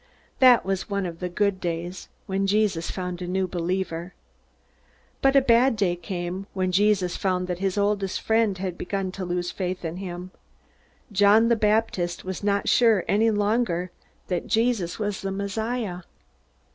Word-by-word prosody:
That 250 -5 +6
was 195 +1 -2
one 200 -1 -1
of 170 -2 -6
the 180 - -3
good 200 +1 0
days, 175 +1 -4 0.2
when 195 0 -1
Jesus 200 -5 +1
found 180 -1 -4
a 180 - -4
new 190 +1 0
believer. 180 0 -3 1.1
But 270 0 +3
a 275 - +7
bad 240 0 +4
day 195 -4 +1
came, 175 +2 -5
when 185 -1 0
Jesus 195 -2 +2
found 185 -1 0
that 180 -1 -4
his 195 0 -1
oldest 200 -1 0
friend 220 -3 +1
had 185 -1 -4
begun 190 0 -2
to 190 0 -6
lose 175 0 -2
faith 185 -2 -4
in 165 +2 -4
him. 180 -1 -6 0.8
John 205 +3 +5
the 235 - +4
Baptist 210 -6 0
was 190 +1 -5
not 200 0 +1
sure 225 -6 +4
any 220 +3 +3
longer 205 -4 0 0.4
that 180 -2 -2
Jesus 225 -6 +1
was 205 -2 -3
the 195 - -3
Messiah. 200 0 -3
195 Hz, 160 wpm, -25 LUFS, 180-210 Hz, 1.1 s, a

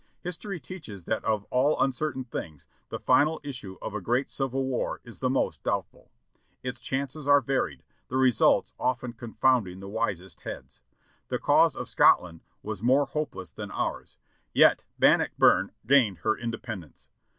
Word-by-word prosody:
History 180 +1 -5
teaches 125 - -9
that 110 - -1
of 110 -2 0
all 135 +4 +2
uncertain 135 0 0
things, 80 - -7 0.2
the - - -4
final 155 +2 +3
issue 120 -10 -7
of - - -4
a 105 - -3
great 120 +8 0
civil 135 0 -1
war 130 -2 -2
is 120 -2 -11
the 130 - 0
most 130 - 0
doubtful. - - -3 0.5
Its 125 -1 -5
chances 140 +3 -3
are 145 0 +7
varied; 120 - -2 0.2
the 130 - -2
results 130 -3 +3
often 125 -1 -1
confounding 115 -5 0
the 95 - -8
wisest 100 -4 -3
heads. 65 0 -8 0.5
The - - -1
cause - - +4
of - - -5
Scotland 80 -2 +4 0.2
was - - -5
more 130 +4 +4
hopeless 135 - -4
than - - -7
ours, - - -4 0.4
yet - - +6
Bannockburn - - +4
gained 120 -7 +4
her 110 - +2
independence. 115 - -7
125 Hz, 150 wpm, -27 LUFS, 105-135 Hz, 0.5 s, are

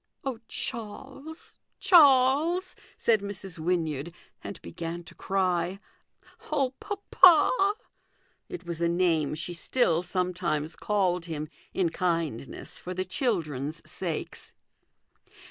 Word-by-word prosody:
' - - -54
" - - -50
Oh, 260 -4 -2
Charles, 270 +7 -6 0.2
Charles! 310 +3 +5
" - - -28
said 225 -2 +3
Mrs. 195 -3 -7
Wynyard, 160 -2 -1 0.3
and - - -7
began 165 - -5
to - - -12
cry; 185 -1 0 0.3
" - - -21
Oh, 275 -4 +1
papa! 400 -1 +5 0.4
" - - -41
It 360 - -7
was 170 -1 -5
a 170 - +3
name 170 -4 +2
she 170 +3 -4
still 170 -2 +1
sometimes 175 -4 -1
called 185 -4 0
him, 155 -2 -5 0.2
in 180 -3 +1
kindness, 165 -8 -2
for 180 +1 -6
the 185 +1 -1
children's 165 - -2
sakes. 170 -4 -5
180 Hz, 125 wpm, -28 LUFS, 165-260 Hz, 0.4 s, Charles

